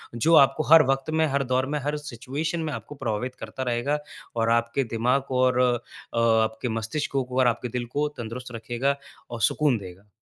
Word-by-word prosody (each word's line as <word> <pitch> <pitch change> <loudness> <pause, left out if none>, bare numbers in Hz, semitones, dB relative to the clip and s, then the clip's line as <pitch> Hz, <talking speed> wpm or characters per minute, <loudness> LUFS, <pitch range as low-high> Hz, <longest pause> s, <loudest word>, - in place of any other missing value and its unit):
जो 160 +8 +2
आपको 140 +2 +5
हर 165 -1 +10
वक़्त 135 +2 0
में, 160 - +4
हर 140 -1 0
दौर 130 +1 +2
में, - - +1
हर 145 +2 -1
सिचुएशन 145 +4 -4
में 155 - -3
आपको 145 - -7
प्रभावित 125 -1 -3
करता 130 - -5
रहेगा 125 +4 0 0.4
और 115 -1 +1
आपके 115 +3 +1
दिमाग 125 +4 +2
को 130 -1 -1
और 125 -1 +3
अ, 120 -1 -1
आपके 110 +1 +2
मस्तिष्क 115 +7 -3
को 135 - +1
और 130 - +5
आपके 120 +1 0
दिल 120 - -2
को 150 +1 +2
तंदुरुस्त 120 +2 -6
रखेगा 120 +4 -1 0.3
और 120 -1 -6
सुकून 140 +4 +3
देगा। 95 0 -11
125 Hz, 195 wpm, -25 LUFS, 115-140 Hz, 0.4 s, हर